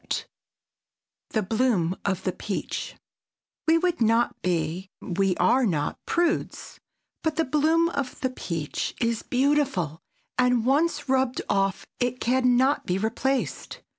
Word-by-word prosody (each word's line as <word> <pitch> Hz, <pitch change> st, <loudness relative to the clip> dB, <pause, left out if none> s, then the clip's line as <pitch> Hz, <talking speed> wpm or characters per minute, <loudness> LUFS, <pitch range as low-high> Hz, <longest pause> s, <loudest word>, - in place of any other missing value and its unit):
[Sidenote: -, -, -3 dB, 1.0 s
THE 220 Hz, -, 0 dB
BLOOM 205 Hz, -5 st, +1 dB
OF 190 Hz, -2 st, -1 dB
THE 185 Hz, -, 0 dB
PEACH] 195 Hz, +2 st, -4 dB, 0.7 s
We 325 Hz, +1 st, +6 dB
would 350 Hz, -4 st, 0 dB
not 230 Hz, +1 st, +2 dB
be—we 180 Hz, +2 st, -1 dB
are 245 Hz, +8 st, +4 dB
not—prudes, 205 Hz, -, -1 dB, 0.4 s
but 315 Hz, -1 st, -1 dB
the 325 Hz, 0 st, +1 dB
bloom 315 Hz, +4 st, +3 dB
of 280 Hz, -5 st, -4 dB
the 260 Hz, -, 0 dB
peach 165 Hz, -, -4 dB
is 230 Hz, -2 st, 0 dB
beautiful, 260 Hz, -, +1 dB, 0.4 s
and 250 Hz, -2 st, +3 dB
once 295 Hz, +2 st, +2 dB
rubbed 260 Hz, -1 st, +1 dB
off 195 Hz, -1 st, 0 dB
it 250 Hz, 0 st, 0 dB
can 250 Hz, 0 st, +3 dB
not 265 Hz, +3 st, +2 dB
be 180 Hz, -, +1 dB
replaced. 240 Hz, +6 st, -2 dB
245 Hz, 125 wpm, -26 LUFS, 190-275 Hz, 1.0 s, We